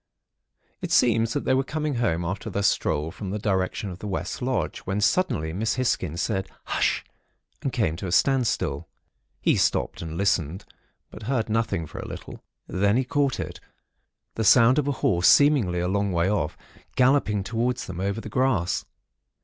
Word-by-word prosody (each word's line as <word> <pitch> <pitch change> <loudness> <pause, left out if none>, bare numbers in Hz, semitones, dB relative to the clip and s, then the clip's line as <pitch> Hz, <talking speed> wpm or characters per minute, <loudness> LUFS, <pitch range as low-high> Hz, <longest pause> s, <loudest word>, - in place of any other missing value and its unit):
It - - -4
seems 115 -1 +3
that - - -2
they - - +3
were 135 +1 +2
coming 150 -1 -2
home 85 -8 0
after 95 +2 -4
their 100 - -2
stroll, 80 -4 +1
from 100 +2 -7
the 105 - -2
direction 95 -1 -1
of 90 - -9
the 105 - -6
West 95 +5 -4
Lodge; 130 0 -1
when, 95 +2 -3
suddenly, 105 - +1
Miss 105 +3 -1
Hisgins 90 - -1
said, 95 0 -2
'Hush!' - - 0 0.6
and 135 - -2
came 110 -11 0
to 95 - -5
a - - -4
standstill. 130 +4 +1 0.5
He - - +3
stopped, - - 0
and 80 0 -6
listened; 95 -2 0 0.5
but - - -10
heard 120 -5 0
nothing 105 -6 0
for - - -9
a - - -6
little. - - -9 0.2
Then 100 +4 +1
he 130 - +2
caught 140 +1 0
it——the 110 - -9
sound 120 +5 +6
of 145 - -1
a - - +2
horse, 85 -1 +3
seemingly 135 -12 +5
a 90 - 0
long 100 +1 0
way 85 0 +1
off, 85 -7 -1 0.4
galloping 125 -6 +3
towards 120 +5 -1
them 90 -1 -7
over 100 +3 -1
the 115 - -8
grass. 110 -6 0
105 Hz, 175 wpm, -25 LUFS, 90-125 Hz, 0.6 s, sound